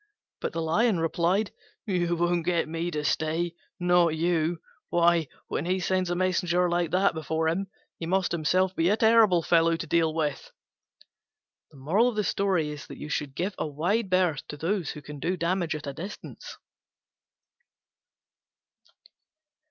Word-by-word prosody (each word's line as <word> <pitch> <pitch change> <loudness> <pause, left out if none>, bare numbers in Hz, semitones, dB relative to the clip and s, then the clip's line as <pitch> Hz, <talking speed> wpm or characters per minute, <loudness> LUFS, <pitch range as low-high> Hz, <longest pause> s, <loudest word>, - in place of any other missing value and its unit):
But - - -3
the 165 - -2
Lion 195 +4 +2
replied, 175 +5 +1 0.3
"You 175 -4 0
won't 175 0 +1
get 170 -1 +1
me 165 +2 -3
to 150 -3 -3
stay, 160 +3 0 0.3
not 175 -2 +3
you: 165 0 0 0.3
why, 170 -2 +3 0.2
when 155 - -3
he 185 +1 +1
sends 185 0 0
a 175 - 0
messenger 180 -1 +1
like 175 -1 0
that 190 +2 +2
before 160 0 -1
him, 185 +5 0 0.3
he 165 - -4
must 190 +1 +1
himself 185 +3 +1
be 165 +2 +2
a 210 - +3
terrible 220 -6 +5
fellow 165 0 +3
to 165 - -5
deal 165 0 +2
with." 155 -3 -3 1.2
Give 165 - -1
a - - -1
wide 180 +9 -1
berth 180 -6 +1
to 145 - -7
those 170 +1 -1
who 150 - -7
can 145 +1 -9
do 180 +5 -1
damage 170 -1 0
at 155 - -6
a 140 - -4
distance. 190 +9 -8
170 Hz, 135 wpm, -27 LUFS, 160-185 Hz, 1.2 s, terrible